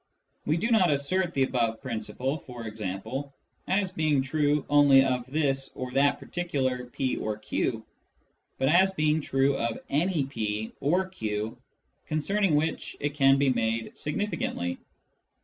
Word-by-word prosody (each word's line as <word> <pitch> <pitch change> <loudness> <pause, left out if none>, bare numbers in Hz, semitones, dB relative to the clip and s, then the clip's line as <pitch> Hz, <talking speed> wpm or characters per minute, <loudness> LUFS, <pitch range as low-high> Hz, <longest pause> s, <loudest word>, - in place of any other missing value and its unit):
We 155 +2 +2
do 230 +7 -1
not 195 -6 +5
assert 170 +5 0
the 135 - +3
above 115 -4 0
principle, 130 +4 -3
for 125 -3 -9
example, 110 +6 -5 0.3
as 190 0 +1
being 155 -5 +1
true 145 +1 +1
only 140 -2 +6
of 125 -2 -1
this 135 -3 0
or 130 -1 -5
that 140 +2 +3
particular 130 -8 -2
p 130 +1 -2
or 105 -1 -3
q, 110 - -2 0.7
but 135 - +1
as 190 +5 +4
being 155 0 +2
true 135 0 +2
of 115 -3 -1
any 155 0 +1
p 110 -4 -3
or 180 +6 +1
q 110 - -3 0.5
concerning 180 +3 +1
which 155 +2 -1
it 145 0 -2
can 135 -2 +5
be 140 -1 +3
made 115 -2 -1
significantly. 150 - -2
140 Hz, 145 wpm, -27 LUFS, 125-155 Hz, 0.7 s, only